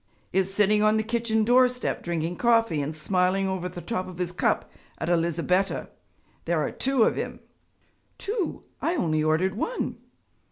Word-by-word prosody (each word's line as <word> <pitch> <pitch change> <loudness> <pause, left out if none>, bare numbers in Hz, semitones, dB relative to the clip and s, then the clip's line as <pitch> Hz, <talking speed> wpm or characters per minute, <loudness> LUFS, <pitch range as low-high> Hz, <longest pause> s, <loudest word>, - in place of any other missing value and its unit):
'Is 190 0 +1
sitting 210 +1 +3
on 215 +1 +4
the 220 - +1
kitchen 225 -1 0
doorstep 250 +2 +3
drinking 170 0 -2
coffee 230 -10 +3
and 150 +2 -3
smiling 185 +4 +1
over 185 -1 -2
the 175 0 -8
top 185 +1 -3
of 185 -2 -9
his 180 -1 -2
cup 180 - 0 0.3
at - - -3
Elizabetta. 170 +3 +1 0.6
There - - +1
are - - -1
two 265 -3 +2
of - - +2
him.' - - -4 0.8
'Two! 410 -3 -3 0.2
I 335 - +1
only 155 - +1
ordered 160 +5 +2
one.' 455 - -3
190 Hz, 160 wpm, -26 LUFS, 175-230 Hz, 0.8 s, on